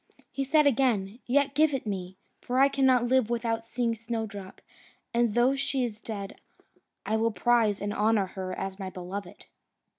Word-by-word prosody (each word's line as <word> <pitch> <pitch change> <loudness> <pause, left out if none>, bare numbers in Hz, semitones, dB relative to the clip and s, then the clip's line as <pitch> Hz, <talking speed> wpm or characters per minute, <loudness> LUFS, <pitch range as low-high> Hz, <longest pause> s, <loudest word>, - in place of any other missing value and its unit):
He 275 - -2
said 300 +2 +3
again, 230 -6 +1
"Yet 280 +2 +2
give 300 0 +3
it 260 - -4
me; 190 -3 -4 0.2
for 250 - -2
I 275 +1 +6
cannot 260 -3 +3
live 255 -2 +3
without 230 -1 -1
seeing 235 0 -1
Snowdrop, 220 -4 -6 0.5
and 235 -2 +2
though 250 +3 +4
she 270 -1 -1
is 220 -3 -4
dead, 200 -3 -7 0.6
I 220 - 0
will 225 +1 +2
prize 225 -2 +2
and 205 0 -3
honour 210 -1 +2
her 185 0 -6
as 195 0 -5
my 190 -1 -4
beloved." 185 +1 -7
230 Hz, 170 wpm, -28 LUFS, 205-255 Hz, 0.6 s, I